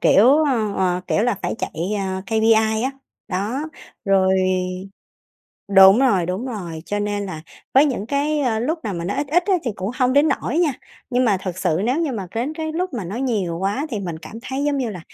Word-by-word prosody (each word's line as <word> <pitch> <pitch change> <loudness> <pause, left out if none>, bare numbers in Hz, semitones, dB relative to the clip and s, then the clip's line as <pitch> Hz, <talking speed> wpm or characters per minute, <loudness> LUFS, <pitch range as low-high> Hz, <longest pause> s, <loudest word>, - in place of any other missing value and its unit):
kiểu, 210 +5 +5 0.2
ờ, 230 -8 0
ờ, 180 -1 +1
kiểu 210 - +1
là, 240 -2 +2
phải - - -1
chạy, - - -4 0.3
ờ, 190 -1 -3
KPI 220 0 +3
á. 265 - 0 0.4
Đó, 205 +8 -2 0.4
rồi 190 -1 +3 1.4
đúng 195 +3 +9
rồi, 200 -11 +3
đúng 190 +8 -3
rồi, 175 -9 -6
cho 205 - -2
nên 205 -1 -2
là 160 -4 -7 0.3
với 275 +3 +7
những 235 -7 -2
cái 280 -4 0
lúc 315 +7 -1
nào 205 -4 -2
mà 170 0 -4
nó 200 - -2
ít 285 - -1
ít 350 +4 +2
á 390 - +3
thì 235 - -1
cũng 190 +3 -3
hông 255 0 +3
đến 285 +3 +4
nỗi 315 - -2
nha, 330 -5 +3 0.4
nhưng 250 +1 +2
mà 210 -5 +3
thực 185 -1 -5
sự 160 -2 0
nếu 255 +8 +1
như 310 -5 -1
mà 200 -6 -4
đến 255 +7 -2
cái 315 -1 -4
lúc 360 0 -2
mà 220 -7 -4
nó 195 +6 -5
nhiều 210 -10 -1
quá 205 - -1
thì 215 -5 -3
mình 170 -4 -5
cảm 165 +7 -10
thấy 270 +2 -3
giống 290 -1 +1
như 245 -4 -1
là 180 -5 -7
220 Hz, 220 wpm, -21 LUFS, 190-270 Hz, 1.4 s, đúng